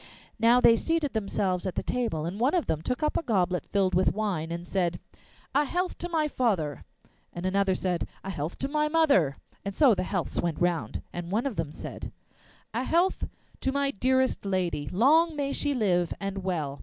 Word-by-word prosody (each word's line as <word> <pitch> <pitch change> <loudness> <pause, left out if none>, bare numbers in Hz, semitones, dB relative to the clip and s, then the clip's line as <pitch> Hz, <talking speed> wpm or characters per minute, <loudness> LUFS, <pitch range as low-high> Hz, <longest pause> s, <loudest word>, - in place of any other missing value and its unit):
Now 235 +2 +5
they 230 -2 +7
seated 320 +1 0
themselves 195 -4 -1
at 185 - -4
the - - -1
table, 230 -11 -1
and 180 +5 -4
one 260 +8 +3
of 350 - +1
them 155 - -1
took 250 - -2
up 300 - +1
a - - +1
goblet 185 - 0
filled 195 -2 +1
with 185 +2 +3
wine, 185 -7 -2
and 170 +1 -4
said, 175 -2 -1 0.5
'A 290 +2 +3
health 360 +5 -1
to 350 - -3
my 315 -3 +1
father!' 190 - 0 0.5
And 175 +1 -5
another 190 0 +2
said, 180 -2 -1 0.2
'A 195 - -4
health 160 -1 -4
to 270 - -2
my 300 +1 +1
mother!' 285 - +3 0.3
and 200 -1 -4
so 275 -6 +6
the 185 - -1
healths 185 -1 -2
went 170 -3 -2
round. 175 -2 -1
Then 175 -1 -5
one 215 +7 0
of 270 -6 -2
them 160 -4 -2
said: - - -7 0.6
'A 240 +3 -1
health 345 +6 +2 0.3
to 265 - 0
my 280 0 +1
dearest 260 +4 +1
lady, 180 -7 -1
Long 310 - +4
may 280 -1 -1
she 290 - 0
live 180 -7 +1
and 195 -1 -4
well! 155 -7 -2
200 Hz, 200 wpm, -28 LUFS, 175-275 Hz, 0.6 s, they